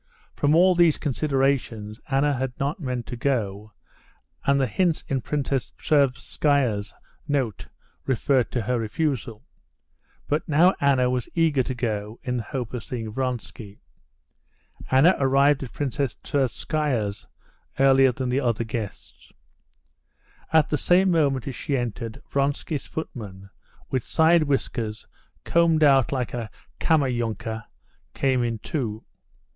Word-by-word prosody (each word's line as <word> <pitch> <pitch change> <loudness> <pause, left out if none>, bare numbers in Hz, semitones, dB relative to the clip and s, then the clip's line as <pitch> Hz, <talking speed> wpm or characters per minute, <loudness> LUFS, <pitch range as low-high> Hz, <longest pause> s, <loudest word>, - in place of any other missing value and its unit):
From 145 +1 +2
all 185 +2 +6
these 170 -3 +4
considerations 135 -7 -1
Anna 140 +2 +2
had 130 -1 -3
not 140 +5 -1
meant 125 -6 -3
to 120 - -6
go, 110 -6 -2 0.8
and 140 0 +4
the 135 - +3
hints 175 +3 0
in 135 -2 -1
Princess 135 -1 -2
Tverskaya's 135 -5 +1 0.3
note 130 - -1 0.4
referred 130 0 +2
to 120 - 0
her 125 +3 0
refusal. 115 -1 -2 0.8
But 150 +2 -1
now 170 +5 +5
Anna 135 -3 +3
was 125 -2 -2
eager 160 -5 +3
to 130 +1 -3
go, 110 -2 -3
in 125 0 -2
the - - -1
hope 125 -1 -5
of 120 -4 -4
seeing 115 -3 -5
Vronsky. 120 -4 -5 1.1
Anna 140 +8 +6
arrived 140 +1 +3
at 130 - -6
Princess 140 -2 -2
Tverskaya's 135 -5 -1 0.5
earlier 135 -1 +6
than 125 +1 -3
the 125 +2 +1
other 120 -4 0
guests. 110 -3 -7 1.2
At 160 -2 +4
the 150 - +1
same 185 +1 +4
moment 140 -7 +1
as 135 - -3
she 140 +2 -2
entered, 120 +2 -5
Vronsky's 140 +1 -1
footman, 100 -10 -7 0.4
with 130 - +1
side 165 +1 +4
whiskers 115 -6 -2 0.4
combed 165 -2 +3
out 135 -3 +5
like 130 -4 -2
a 120 -3 -4 0.3
Kammerjunker, 120 -7 0 0.5
went 130 -2 +2
in 115 -1 -1
too. 110 -3 -4
130 Hz, 130 wpm, -24 LUFS, 115-145 Hz, 1.2 s, all